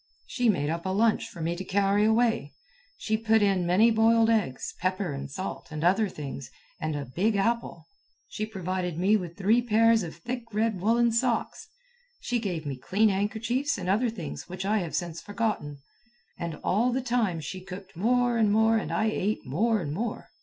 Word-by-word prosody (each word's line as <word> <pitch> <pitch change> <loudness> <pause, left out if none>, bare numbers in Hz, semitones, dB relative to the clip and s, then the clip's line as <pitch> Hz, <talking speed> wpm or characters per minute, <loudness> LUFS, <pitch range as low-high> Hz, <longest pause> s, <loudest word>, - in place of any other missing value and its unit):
She 245 -4 0
made 150 -7 +1
up 170 +2 -3
a - - 0
lunch 215 +4 +2
for 170 - -10
me 170 +2 -1
to 185 - -5
carry 200 +2 +2
away. 225 +1 +1 0.4
She 220 0 -1
put 220 -1 +3
in 190 -3 +2
many 210 +7 +5
boiled 225 0 +4
eggs, 190 - -1
pepper 185 -2 -1
and 140 0 -6
salt, 185 +7 -6
and 155 -1 -5
other 195 +4 +3
things, 140 -5 -7 0.3
and 155 -1 -2
a 145 -1 -4
big 195 - 0
apple. 230 +4 -1 0.4
She 215 0 -4
provided 185 -4 -3
me 195 +5 +3
with 175 -5 -3
three 210 +5 +3
pairs 230 -1 +4
of 165 -4 -6
thick 240 +8 -5
red 215 -3 0
woollen 235 +3 +3
socks. 240 - -1 0.5
She 245 -1 -1
gave 180 -8 -3
me 140 -2 -4
clean 210 +10 +2
handkerchiefs 225 +8 -1
and 185 -2 -5
other 220 +6 +2
things 180 -9 -7
which 185 +1 -5
I 210 +2 +2
have 170 -4 -4
since 170 -2 -3
forgotten. 205 -9 -2 0.6
And 170 -2 -3
all 230 +7 +2
the 260 +2 0
time 235 -8 0
she 185 +5 -6
cooked 190 +1 -10
more 240 +5 +2
and 215 -2 +3
more 220 +1 +4
and 220 - -3
I 220 - +1
ate 215 -1 -1
more 215 - +1
and 145 -3 -4
more. 225 +8 -4
205 Hz, 190 wpm, -27 LUFS, 175-225 Hz, 0.6 s, many